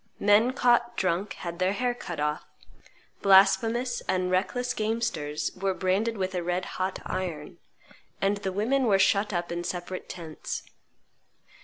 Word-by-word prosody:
Men 210 +5 +4
caught 240 -1 +2
drunk 185 +2 0
had 170 0 -7
their 185 +1 +2
hair 245 +3 0
cut 175 -9 -7
off; 150 +1 -1 0.8
blasphemous 225 +5 +4
and 185 -1 +1
reckless 245 +7 0
gamesters 190 -9 -2
were 190 0 -1
branded 200 +5 0
with 190 -1 -2
a 180 - -1
red 180 +1 -1
hot 185 +1 -3
iron; 175 -5 -4 0.6
and 200 +1 +1
the 195 -1 -3
women 245 +8 +1
were 200 -4 +4
shut 200 +2 +3
up 175 -2 -2
in 170 0 -3
separate 180 +1 -5
tents. 165 -3 -6
190 Hz, 145 wpm, -27 LUFS, 180-220 Hz, 0.8 s, Men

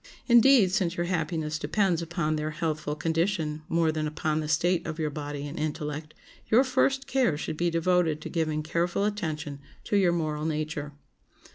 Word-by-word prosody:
Indeed, 240 -4 +6
since 185 -3 0
your 175 - 0
happiness 160 -3 -2
depends 190 -3 +1
upon 165 -2 -1
their 155 0 -2
healthful 155 -2 -2
condition 160 -1 -1
more 165 -1 +2
than 155 -1 -2
upon 155 0 -1
the 155 - -3
state 165 +3 +1
of 160 -1 -4
your 155 -2 -1
body 145 -1 -5
and 145 - -6
intellect, 150 0 -4 0.3
your 235 +4 +5
first 265 +1 +1
care 260 - +1
should 155 - -4
be 175 +2 +1
devoted 165 -2 +2
to - - -6
giving 155 -2 -1
careful 170 +5 0
attention 155 -9 -3 0.2
to - - -1
your 185 -3 +4
moral 155 -3 -2
nature. 150 -2 -3
160 Hz, 170 wpm, -27 LUFS, 150-180 Hz, 0.3 s, Indeed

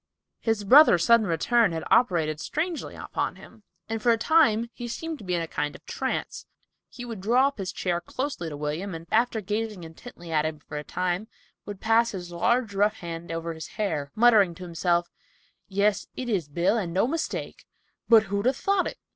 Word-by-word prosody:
His 225 -2 -1
brother's 225 - +7
sudden 230 -2 +5
return 200 +5 +2
had 160 -1 -3
operated 165 -9 +3
strangely 320 - -3
upon - - -3
him, 220 - -15 0.3
and 225 0 -3
for 235 - +4
a 230 - +3
time 235 -4 +3
he 240 - -6
seemed 320 +6 -5
to - - -11
be 180 -2 -1
in 170 - -1
a - - -5
kind 150 -1 -3
of - - -15
trance. - - -4 0.4
He 245 - -9
would 225 -5 -7
draw 250 +7 +3
his 195 -9 -5
chair 175 -2 -1
up 170 - -10
closely 260 - -3
to 145 - -7
William, 155 +6 -3
and, 165 0 -8
after 230 0 +2
gazing 210 -1 -3
intently 170 +1 -11
at 155 -1 +2
him 155 0 -3
for 150 0 -7
a - - -7
time, 180 +6 -2 0.4
would 205 -2 -7
pass 225 +1 +2
his 175 -2 -6
large 230 +5 +1
rough 205 +2 +2
hand 170 -3 -7
over 165 0 -3
his 160 0 -8
hair, 160 -10 -2
muttering 215 -6 +5
to 185 - -10
himself, 175 0 0 0.6
"Yes, 200 +1 +1
it 255 -1 -4
is 185 -9 0
Bill, 175 +9 +1
and 175 -4 -4
no 195 - +3
mistake, 320 +6 -4 0.4
but 225 -2 +7
who'd 200 +2 -1
a 260 - +4
thought 390 +7 0
it?" - - -7
200 Hz, 200 wpm, -26 LUFS, 170-235 Hz, 0.6 s, brother's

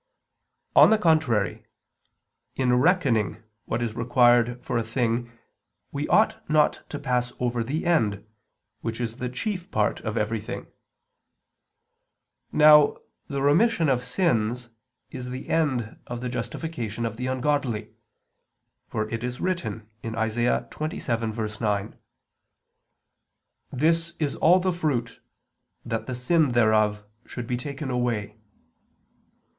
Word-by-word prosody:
On - - +9
the 220 - +5
contrary, 155 - +1 0.9
In 125 -2 +2
reckoning 120 - +2 0.2
what 120 +1 -2
is 115 -2 -2
required 120 0 +3
for 115 - 0
a - - -1
thing 115 +1 -1 0.6
we 145 +1 -3
ought 220 +1 +3
not 150 -1 +3
to 145 - -4
pass 125 -3 -1
over 120 -1 0
the 145 +9 -3
end, 110 - +1 0.5
which 115 +1 -4
is 115 -1 -3
the 125 -1 -3
chief 180 - -4
part 105 0 0
of 110 -2 -4
everything. 110 0 -3 1.9
Now 150 -1 +7 0.3
the 140 -1 -3
remission 165 +3 +3
of 125 -2 +1
sins 120 - 0 0.4
is 125 -1 -6
the 130 +1 -7
end 130 -9 0
of 120 - -5
the 125 - -3
justification 120 -4 -4
of 115 -1 -4
the 125 +1 -3
ungodly; 130 -4 -1 0.9
for 110 0 -2
it 115 0 -3
is 125 0 -4
written 170 - -3 0.2
(Isa. 115 +1 0
27:9): 110 - -2 1.8
"This 165 +5 +1
is 150 -3 -1
all 180 +3 +5
the 185 0 0
fruit, 140 -9 -2 0.6
that 115 -1 -3
the 130 - -3
sin 145 +2 +2
thereof 110 -3 +3 0.2
should 120 - -6
be 125 +1 -1
taken 135 +2 -5
away." 115 -4 -1
125 Hz, 120 wpm, -25 LUFS, 115-150 Hz, 1.9 s, On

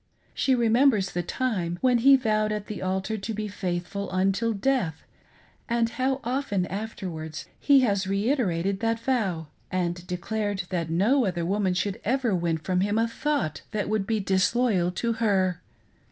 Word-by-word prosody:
She 265 - +2
remembers 230 -3 +3
the 175 - -1
time 175 -4 -2
when 250 -2 +4
he 275 +3 +7
vowed 215 -4 +1
at 210 -1 -3
the 210 - -6
altar 190 +3 -2
to 215 +3 -4
be 215 0 -3
faithful 195 0 -3
until 195 +5 +1
death, 205 - 0 0.7
and 235 -1 +2
how 265 +2 -1
often 240 -7 -1
afterwards 180 -6 -5
he 280 -2 +5
has 200 -5 +1
reiterated 195 - 0
that 225 +1 0
vow 215 -10 -1 0.3
and 175 -1 -2
declared 200 +2 -2
that 170 -3 -1
no 220 +11 +3
other 175 -3 -1
woman 190 0 +1
should 195 +1 -2
ever 245 -1 +1
win 170 -2 0
from 180 +3 -1
him 205 +2 +1
a 225 +1 +2
thought 230 - -2
that 210 -2 -1
would 215 -2 0
be 220 -1 +1
disloyal 195 0 +2
to 230 +4 -1
her. 190 -6 +1
205 Hz, 160 wpm, -26 LUFS, 185-230 Hz, 0.7 s, he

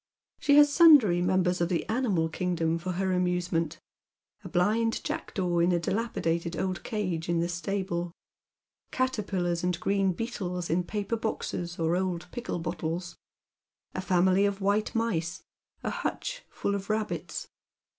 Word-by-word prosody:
She 285 - +4
has 290 -1 +7
sundry 280 - +7
members 180 0 +2
of 170 - +1
the 175 -3 -1
animal 215 -9 +1
kingdom 165 -1 -1
for 180 +2 -3
her 190 +1 0
amusement, 180 -3 0 0.6
a - - -7
blind 220 +6 +1
jackdaw 180 -3 -1
in 170 +2 +4
a 175 - +3
dilapidated 170 -4 -1
old 185 -2 -2
cage 180 -7 -2
in 170 -1 +2
the 170 - +1
stable, 175 -1 -2 0.8
caterpillars 195 -9 -1
and 180 -1 0
green 195 -1 +1
beetles 180 -6 -3
in 175 +2 +1
paper 210 +3 -2
boxes 175 -5 -3
or 165 +1 +1
old 180 -2 -2
pickle 240 -5 -4
bottles, 170 +1 -3 0.8
a 185 - -3
family 185 +2 +3
of 200 -1 -3
white 205 +3 +1
mice, 185 -6 -1 0.4
a - - -1
hutch - - -4
full 200 - -2
of 200 0 -4
rabbits. 215 0 -2
180 Hz, 145 wpm, -28 LUFS, 170-210 Hz, 0.8 s, has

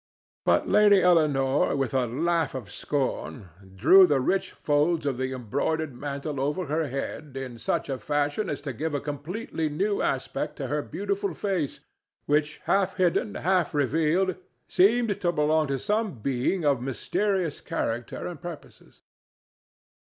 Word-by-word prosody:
But - - +3
Lady 205 -2 +6
Eleanore, 145 -6 +3
with 135 -3 -1
a 130 -2 +1
laugh 160 +4 0
of 115 -9 -6
scorn, 130 -7 -3 0.3
drew 180 - +7
the 145 -4 +2
rich 190 +8 0
folds 150 +2 +1
of 135 -3 -1
the 130 0 -1
embroidered 135 +5 -2
mantle 140 +2 -4
over 150 +7 -1
her 155 +2 -1
head 135 +1 -5
in 130 -3 -6
such - - -1
a 135 -2 -3
fashion 145 - -1
as 145 - -3
to 140 -2 -5
give 150 +5 -3
a - - 0
completely 155 +3 -4
new 200 +8 0
aspect - - -2
to - - -5
her - - -1
beautiful 400 0 -3
face, 185 -8 -2 0.4
which, 150 +1 +1
half 195 -1 +1
hidden, 185 +4 +1
half 180 -4 +1
revealed, 160 +6 +1 0.3
seemed 210 +1 +3
to 175 -2 +2
belong 155 -1 +2
to 135 0 -1
some 210 - -1
being 135 - -1
of 140 -4 +2
mysterious 175 +6 -1
character 120 -8 -3
and 170 -5 -6
purposes. 175 -3 -10
150 Hz, 150 wpm, -26 LUFS, 135-180 Hz, 0.4 s, drew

